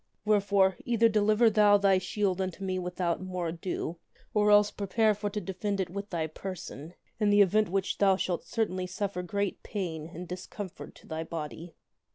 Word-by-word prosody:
Wherefore, 200 -3 +3
either 230 -1 +3
deliver 215 +1 +3
thou 205 -1 +6
thy 195 -2 +4
shield 190 0 -1
unto 190 +1 -4
me 185 -1 -1
with 180 0 -6
out 170 -1 0
more 180 -2 -3
ado 170 0 -4 0.3
or 210 -1 +3
else 205 0 +6
prepare 215 +2 +2
for 205 0 -3
to 210 +1 -3
defend 200 +1 -3
it 185 -2 -2
with 200 +2 -5
thy 165 -3 -1
person 170 -1 -7 0.2
in 210 -2 +3
the 205 0 +6
which 195 -1 +1
event - - -21
thou 195 -1 +5
shalt 180 -2 -2
certainly 185 -5 -2
suffer 185 0 -3
great 200 +2 -2
pain 165 -7 -4
and 175 +2 -8
discomfort 185 +1 -7
to - - -17
thy 160 0 -3
body." 165 +1 -7
190 Hz, 185 wpm, -29 LUFS, 180-205 Hz, 0.3 s, thou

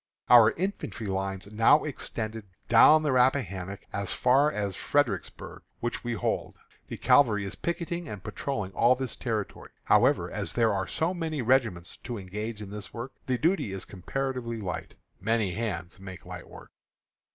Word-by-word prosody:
Our 115 -3 +9
infantry 185 - -4
lines 95 0 -3
now 115 +7 +5
extend 110 -6 -4 0.3
down 155 +7 +7
the 150 - +1
Rappahannock 105 - +1
as 100 -2 -2
far 135 +4 +3
as 100 -6 -2
Fredericksburg, 145 -5 -1 0.2
which 120 0 -3
we 120 -1 -2
hold. 115 - -2 0.3
The - - -6
cavalry 110 -8 +4
is 100 - -4
picketing 170 0 -3
and 105 -4 -7
patrolling 105 -2 -3
all 120 +5 +4
this 130 -1 -3
territory. 110 -4 -4
However, - - +3
as - - -3
there 115 -3 +3
are 95 -1 -1
so 165 +4 0
many 160 -6 -3
regiments 110 -8 +1
to 120 -2 -6
engage 105 +3 -5
in 100 - -9
this 105 0 -7
work, 120 +3 -6 0.2
the 130 -1 +1
duty 165 - +1
is 95 -1 -4
comparatively 120 +4 -4
light. 90 -5 -5 0.2
"Many 110 -2 +1
hands 95 -4 -4
make 95 -2 -10
light - - -9
work." - - -13
115 Hz, 160 wpm, -28 LUFS, 100-135 Hz, 0.3 s, Our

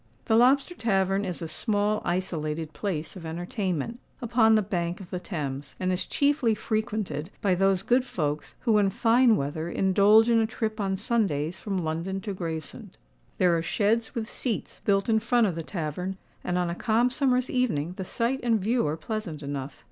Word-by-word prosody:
The - - +1
Lobster 265 +7 +4
Tavern 195 - +1
is 180 -2 -4
a - - -3
small 210 +5 0
isolated 160 -3 -2
place 165 -6 -3
of 185 - -9
entertainment, 175 - -3 0.2
upon 230 -3 +4
the 215 - +3
bank 175 -3 -2
of 185 -3 -11
the 180 - -2
Thames, 145 -6 -5
and 185 0 0
is 180 - -2
chiefly 280 -6 +2
frequented 210 -8 -2
by 195 -3 +2
those 195 +1 +2
good 250 +4 +3
folks 150 - -3
who, 220 -4 +3
in 200 -1 +3
fine 230 +3 +4
weather, 155 +3 -3
indulge 200 +5 +5
in 230 -1 +4
a 220 - +2
trip 220 0 -3
on 195 -2 0
Sundays 190 - 0
from 200 -3 -3
London 165 +5 -2
to 205 -1 -4
Gravesend. 165 -4 -6 0.4
There 180 -2 +4
are 165 - +1
sheds, 220 +7 0
with 225 -2 -2
seats, 235 -2 -4
built 195 -1 +2
in 220 -1 +3
front 235 +1 +3
of 190 - 0
the 165 - -4
tavern; 180 +3 -4 0.3
and 180 0 -1
on 175 -1 0
a - - -2
calm 230 +6 +2
summer's 255 -1 +1
evening, 180 - 0
the 190 - -3
site 235 +7 -1
and 230 -2 +2
view 225 0 +1
are 150 +2 -2
pleasant 165 -3 -5
enough. 140 -1 -5
195 Hz, 185 wpm, -27 LUFS, 170-225 Hz, 0.4 s, indulge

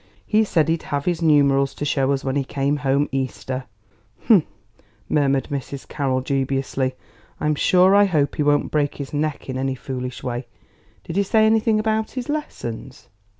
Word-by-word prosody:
He 215 +1 +3
said 165 -6 +2
he'd 165 0 0
have 145 -1 -2
his 175 -2 0
numerals 140 -3 +3
to 145 - -4
show 140 -2 +1
us 135 -1 -1
when 135 0 -2
he 140 - +1
came 140 +2 -1
home 140 0 +1
Easter." 130 -1 -3 0.6
"Hum!" 200 -9 +5 0.6
murmured 140 -2 +1
Mrs. 140 -1 -5
Carroll 135 -3 -1
dubiously; 135 -1 -1 0.4
"I'm 150 0 +1
sure 185 +5 +4
I 205 0 +6
hope 155 -7 +1
he - - 0
won't 145 0 +2
break 145 -2 0
his 140 -1 -7
neck 150 0 -2
in 130 -1 -3
any 135 0 -1
foolish 125 -1 -6
way. 120 0 -4 0.6
Did 170 - -5
he - - +4
say 215 +2 +3
anything 220 0 +3
about 220 0 0
his 255 +1 -5
lessons?" 135 - -5
145 Hz, 175 wpm, -22 LUFS, 135-170 Hz, 0.6 s, I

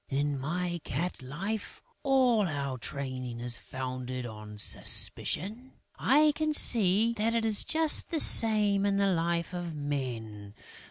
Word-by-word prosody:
In 140 0 -1
my 175 +4 -3
cat 170 +6 -4
life, 195 +12 -5 0.2
all 255 -7 +3
our 140 -4 -4
training 130 -3 -5
is 120 0 -2
founded 130 -1 -6
on 105 -2 -9
suspicion; 215 - -1 0.2
I 300 +4 +4
can 310 0 -1
see 220 0 +4
that 225 +2 +1
it 230 -1 0
is 215 -2 +2
just 320 -1 +1
the 330 - -1
same 210 -6 +5
in 200 -1 +1
the 200 - +2
life 170 +1 -1
of 175 -2 -5
men. 115 -8 -5
170 Hz, 140 wpm, -29 LUFS, -, 0.2 s, same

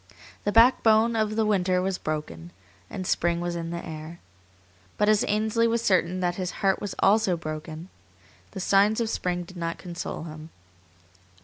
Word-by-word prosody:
The 205 - +1
"backbone 230 -1 +5
of 215 -1 0
the 220 0 +2
winter 185 -3 +2
was 190 0 -2
broken" 85 - -5 0.4
and 185 - -5
spring 170 -1 +1
was 175 0 -3
in 165 -1 -4
the 170 0 -5
air. 160 +2 -8 0.8
But 210 0 +2
as 215 -1 +4
Ainsley 220 +2 +1
was 230 0 0
certain 185 -2 +1
that 175 -1 -1
his 185 -2 -2 0.2
heart 195 -1 +3 0.2
also 205 -1 +3
was - - -9
broken, 155 +1 -6 0.6
the - - -8
signs 200 +3 +3
of 225 -1 -1
spring 180 -1 -2
did 180 +1 -13
not 170 -1 -3
console 175 -3 -6
him. 155 -1 -9
185 Hz, 170 wpm, -26 LUFS, 170-215 Hz, 0.8 s, backbone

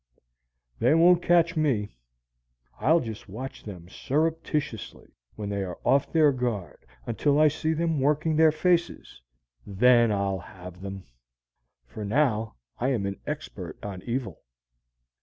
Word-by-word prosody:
They 155 - +4
won't 175 +1 +5
catch 175 0 +3
me! 125 - 0 0.8
I'll 160 +10 +3
just 110 -3 -8
watch 130 +7 -7
them 90 -5 -9
surreptitiously 150 - -3 0.2
when 105 -1 -5
they 100 -1 -2
are 90 -2 -6
off 140 0 +2
their 155 -3 +5
guard 115 - -4 0.2
until 145 +5 +1
I 155 0 +6
see 155 +2 -1
them 165 -1 0
working 150 +3 +1
their 160 0 +5
faces, 170 - -1 0.4
and 100 +5 -10
then 120 0 +5
I'll 100 -2 -1
have 90 0 -12
them! 95 -1 -7 0.8
For 85 - -8
now 110 -1 0 0.2
I 125 - 0
am 120 -7 0
an 100 0 -4
expert 100 - -6
on 95 -3 -6
evil. 120 - -4
125 Hz, 140 wpm, -26 LUFS, 100-155 Hz, 0.8 s, I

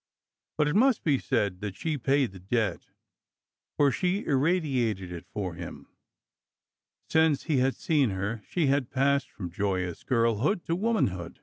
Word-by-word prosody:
But 150 -1 +3
it 150 - 0
must 250 +2 +4
be 145 -5 +2
said 100 -8 -1
that 100 -2 -4
she 160 -2 -2
paid 135 -2 +1
the 95 - -12
debt, 100 0 -1 0.9
for 145 -1 +4
she 185 +7 -1
irradiated 130 - +1
it 85 -1 -8
for 95 -4 -3
him. 85 0 -9 1.2
Since 160 -3 +3
he 155 -5 0
had 130 +1 +2
seen 150 -7 +2
her, 100 +3 -3
she 170 -4 +1
had 140 -2 +1
passed 140 0 +1
from 90 -5 -7
joyous 90 -2 -2
girlhood 120 - +1
to 165 - 0
womanhood. 170 - -1
130 Hz, 150 wpm, -28 LUFS, 100-155 Hz, 1.2 s, must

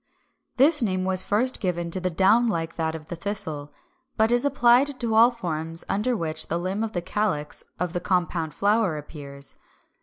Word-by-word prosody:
This 295 +3 +6
name 185 -4 0
was 185 -1 +1
first 220 +7 0
given 175 -3 -2
to 185 - +2
the 185 0 -1
down 195 +7 +3
like 165 -6 -2
that 160 -1 -2
of 155 -1 -9
the 175 - -6
Thistle, 160 -6 -3 0.5
but 220 +1 +3
is 240 0 +4
applied 265 0 +3
to 230 -2 -1
all 230 +2 +7
forms 165 -8 -5
under 225 +4 0
which 160 -2 -2
the 170 - -1
limb 185 +5 -2
of 220 - -4
the 175 - -3
calyx 185 -6 -2
of 180 -1 -3
the 175 - -1
"compound 175 -4 -1
flower" 205 -5 +1
appears. 140 -2 -10
185 Hz, 185 wpm, -25 LUFS, 165-225 Hz, 0.5 s, all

